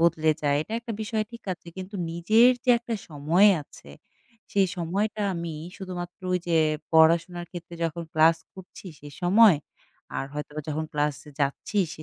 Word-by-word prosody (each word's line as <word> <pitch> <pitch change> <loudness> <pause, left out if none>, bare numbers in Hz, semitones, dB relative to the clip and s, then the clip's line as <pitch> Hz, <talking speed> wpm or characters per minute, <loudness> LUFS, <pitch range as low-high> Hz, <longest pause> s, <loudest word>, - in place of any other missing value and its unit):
বদলে 160 -2 +3
যায়। 145 -1 +2
এটা 215 - -11
একটা 235 -1 -6
বিষয় 215 0 -1
ঠিক 235 - -10
আছে 175 - -12
কিন্তু 190 +2 -8 0.2
নিজের 215 +9 +5
যে 255 - +4
একটা 235 -1 -4
সময় 160 +7 +4
আছে - - -16 0.6
সেই 195 -1 +3
সময়টা 200 +5 -1
আমি 170 -1 -4 0.2
শুধুমাত্র 180 -2 -7
ওইযে 175 -2 0 0.4
পড়াশোনার 170 +2 +4
ক্ষেত্রে 175 -1 -9
যখন 165 +1 -3
ক্লাস 160 +1 +5 0.2
করছি 190 +1 -12
সে 145 - -10
সময় 195 0 +6 0.6
আর - - -2
হয়তোবা 150 +1 -5
যখন 155 +1 -2
ক্লাসে 150 -1 -2
যাচ্ছি 140 +8 -1 0.2
সে 155 - -11
170 Hz, 155 wpm, -26 LUFS, 160-200 Hz, 0.6 s, সময়